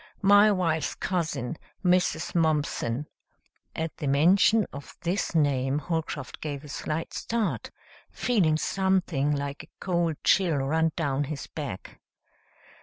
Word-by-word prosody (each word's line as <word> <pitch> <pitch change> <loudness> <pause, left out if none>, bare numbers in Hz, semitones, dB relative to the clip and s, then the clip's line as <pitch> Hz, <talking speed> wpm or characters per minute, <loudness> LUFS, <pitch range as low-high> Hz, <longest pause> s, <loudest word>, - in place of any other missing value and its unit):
My 205 +2 +7
wife's 165 -5 0
cousin, 165 -6 -2 0.3
Mrs. 180 0 +2
Mumpson 150 -5 0 0.3
" - - -48 0.3
At 160 -1 -3
the 145 - -3
mention 185 +9 +4
of 140 - -10
this 175 0 -1
name 140 -3 +2
Holcroft 155 -4 -4
gave 145 -2 -4
a 150 - -11
slight 155 +3 -4
start, 225 -2 -2 0.4
feeling 180 -11 +2
something 185 -6 +1
like 140 0 -4
a - - -15
cold 170 -3 0
chill 175 -5 +3
run 160 +4 +1
down 145 -3 0
his 145 0 -5
back. 140 -12 -7
160 Hz, 125 wpm, -27 LUFS, 145-180 Hz, 0.4 s, My